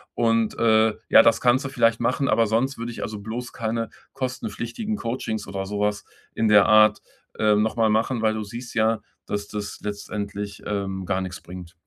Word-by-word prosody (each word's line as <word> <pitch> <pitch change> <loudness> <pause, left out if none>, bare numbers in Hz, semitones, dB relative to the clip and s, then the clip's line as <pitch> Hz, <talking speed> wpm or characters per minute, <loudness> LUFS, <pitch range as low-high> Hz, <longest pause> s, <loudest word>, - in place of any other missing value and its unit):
Und, 115 -1 +1
äh, 110 -1 +4 0.2
ja, - - +9
das 115 - +3
kannst 125 +2 +3
du 135 - -3
vielleicht 115 -3 +2
machen, 135 +3 0
aber 115 -1 +3
sonst 120 +6 0
würde 120 +1 -4
ich, - - -6
also, 105 -1 -5
bloß 115 +4 -6
keine 115 0 -2 0.2
kostenpflichtigen 130 - -4
Coachings 110 -3 -4
oder 95 0 -4
sowas 105 0 -1 0.3
in 110 - +1
der 105 -1 +6
Art, 110 0 +5 0.4
ähm, 105 -1 +4
nochmal 110 0 +1
machen. 115 +2 +1
Weil 110 0 +3
du 110 - -3
siehst 120 +4 -8
ja, 110 -1 +2 0.3
dass 100 0 -3
das 105 -1 -6
letztendlich, 100 0 -5
ähm, 95 -2 -3
gar 95 +1 0
nix 90 -1 -6
bringt. 90 0 -10
110 Hz, 180 wpm, -24 LUFS, 105-115 Hz, 0.4 s, ja